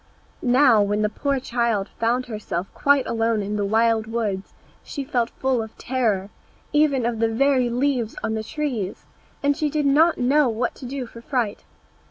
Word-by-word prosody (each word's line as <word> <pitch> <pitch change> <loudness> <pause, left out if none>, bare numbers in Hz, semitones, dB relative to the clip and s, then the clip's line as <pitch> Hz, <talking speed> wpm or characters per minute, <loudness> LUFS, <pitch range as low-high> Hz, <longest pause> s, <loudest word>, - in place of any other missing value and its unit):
Now, 250 -3 +5
when 205 +1 +1
the 210 - +2
poor 275 +5 -1
child 235 -5 0
found 240 +3 +1
herself 210 -6 -4
quite 280 -2 +3
alone 225 -2 0
in 205 +1 -3
the 205 - 0
wild 220 +1 +2
woods, 215 -4 -3 0.3
she 280 - -5
felt 245 -4 0
full 260 -3 0
of 220 0 -9
terror, 215 -6 -1 0.4
even 290 -5 +3
of 235 -2 -1
the 225 - +3
very 255 +1 +2
leaves 245 -2 0
on 220 - -1
the 220 0 -2
trees, 235 -7 -4 0.4
and 285 0 +3
she 305 0 0
did 295 0 -1
not 310 +4 +4
know 270 +2 +3
what 235 +2 -1
to 255 - -6
do 265 0 -4
for 230 0 -12
fright. 235 -5 -2
235 Hz, 180 wpm, -23 LUFS, 220-275 Hz, 0.4 s, Now